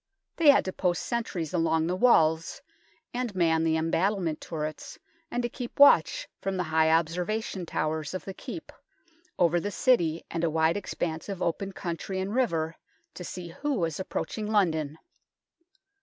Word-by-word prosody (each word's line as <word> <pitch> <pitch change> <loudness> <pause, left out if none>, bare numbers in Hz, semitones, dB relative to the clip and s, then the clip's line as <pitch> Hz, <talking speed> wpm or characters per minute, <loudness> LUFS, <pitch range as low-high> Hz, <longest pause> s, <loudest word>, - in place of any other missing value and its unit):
They 320 -3 +5
had 280 - +6
to 185 - -3
post 175 -3 0
sentries 195 -9 -3
along 160 -2 +2
the 175 +2 0
walls 165 -7 +3 0.5
and 245 -4 -3
man 165 -3 +2
the 160 -1 +2
em 160 +1 -1
battled 185 -4 0
turrets, 155 -2 -5 0.3
and 245 0 -2
to - - +1
keep 245 +2 -7
watch - - +6
from 195 -1 -2
the 180 - 0
high 160 -1 +2
observation 175 +4 0
towers 155 +1 -2
of 185 - -5
the 195 - -5
Keep, 270 - -8 0.7
over 175 0 +3
the 205 - -3
City 175 -9 +2
and 165 0 -2
a 165 - +3
wide 160 +1 +2
expanse 170 -4 -4
of 195 -3 -4
open 195 +4 -1
country 185 +1 -4
and 190 +2 -3
river, 165 -11 0 0.4
to 180 - -8
see 175 0 -7
who 285 - -2
was 165 -6 -1
approaching 210 +3 -3
London. 160 -8 +1
175 Hz, 165 wpm, -28 LUFS, 160-205 Hz, 0.7 s, had